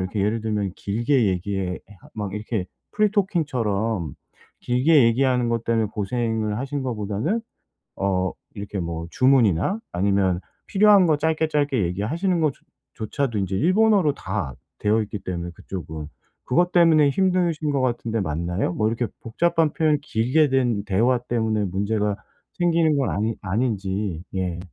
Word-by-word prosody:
이렇게 95 Hz, +3 st, -2 dB
예를 110 Hz, +2 st, 0 dB
들면 105 Hz, -4 st, -1 dB
길게 120 Hz, +4 st, +1 dB
얘기해 95 Hz, 0 st, -2 dB
해 -, -, -7 dB, 0.4 s
막 105 Hz, -3 st, -4 dB
이렇게 105 Hz, -2 st, -3 dB, 0.3 s
free 210 Hz, -1 st, +3 dB
talking처럼 115 Hz, -, -1 dB, 0.5 s
길게 130 Hz, +3 st, +4 dB
얘기하는 125 Hz, +1 st, +2 dB
것 115 Hz, -1 st, -1 dB
때문에 115 Hz, -1 st, +1 dB
고생을 110 Hz, 0 st, -1 dB
하신 135 Hz, +2 st, -3 dB
거보다는 115 Hz, -, -2 dB, 0.6 s
어 95 Hz, -2 st, 0 dB, 0.2 s
이렇게 100 Hz, 0 st, -5 dB
뭐 85 Hz, -1 st, -4 dB
주문이나 130 Hz, -, +3 dB
아니면 95 Hz, -1 st, +1 dB, 0.3 s
필요한 205 Hz, -2 st, +5 dB
거 155 Hz, -3 st, +3 dB
짧게 160 Hz, +1 st, 0 dB
짧게 145 Hz, -7 st, +1 dB
얘기하시는 155 Hz, -, -1 dB
것 155 Hz, -3 st, +2 dB
조 -, -, -29 dB, 0.3 s
조차도 115 Hz, +1 st, -2 dB
인제 95 Hz, -1 st, -1 dB
일본어로 185 Hz, -, +3 dB
다 65 Hz, -, -4 dB, 0.2 s
되어 110 Hz, +2 st, +2 dB
있기 105 Hz, 0 st, -6 dB
때문에 90 Hz, -2 st, -5 dB
그쪽은, 80 Hz, -5 st, -7 dB, 0.4 s
그것 175 Hz, +7 st, +1 dB
때문에 160 Hz, -4 st, +5 dB
힘드신 175 Hz, -2 st, +1 dB
것 140 Hz, -, 0 dB
같은데 120 Hz, -2 st, -1 dB
맞나요? 85 Hz, +2 st, -1 dB
뭐 110 Hz, +3 st, +1 dB
이렇게 115 Hz, +1 st, -1 dB
복잡한 165 Hz, +6 st, +1 dB
표현이 155 Hz, -2 st, +2 dB
길게 140 Hz, +4 st, +2 dB
된 120 Hz, -6 st, +1 dB
대화 115 Hz, +6 st, +2 dB
때문에 110 Hz, -3 st, -1 dB
문제가 100 Hz, +2 st, -1 dB, 0.4 s
생기는 165 Hz, -3 st, +2 dB
건 135 Hz, -, +1 dB
아니 110 Hz, +2 st, -1 dB
아닌지 100 Hz, -4 st, -2 dB
예. 90 Hz, -2 st, -2 dB
115 Hz, 345 characters per minute, -23 LUFS, 100-145 Hz, 0.6 s, 필요한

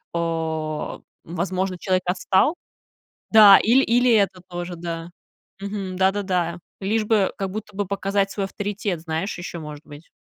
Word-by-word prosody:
э, 160 Hz, -2 st, -2 dB, 0.2 s
возможно, 185 Hz, +2 st, -2 dB
человек 185 Hz, 0 st, 0 dB
отстал 190 Hz, -, +2 dB, 0.8 s
Да, 210 Hz, -3 st, +9 dB
ил 240 Hz, +5 st, +4 dB
или 245 Hz, -1 st, +3 dB
это 195 Hz, -4 st, +2 dB
тоже, 175 Hz, 0 st, -5 dB
да. 165 Hz, 0 st, -6 dB, 0.5 s
Мгм. 195 Hz, -2 st, -5 dB
Да-да-да, 190 Hz, -3 st, 0 dB, 0.2 s
лишь 215 Hz, +3 st, 0 dB
бы, 210 Hz, -3 st, +2 dB
как 195 Hz, -1 st, -3 dB
будто 210 Hz, +1 st, -7 dB
бы 205 Hz, -, -1 dB
показать 195 Hz, +1 st, 0 dB
свой 200 Hz, -, -3 dB
авторитет, 200 Hz, -2 st, -3 dB
знаешь, 160 Hz, +4 st, -3 dB
ещё 175 Hz, -1 st, -6 dB
может 150 Hz, 0 st, -9 dB
быть. 145 Hz, +3 st, -13 dB
190 Hz, 140 wpm, -23 LUFS, 170-205 Hz, 0.8 s, Да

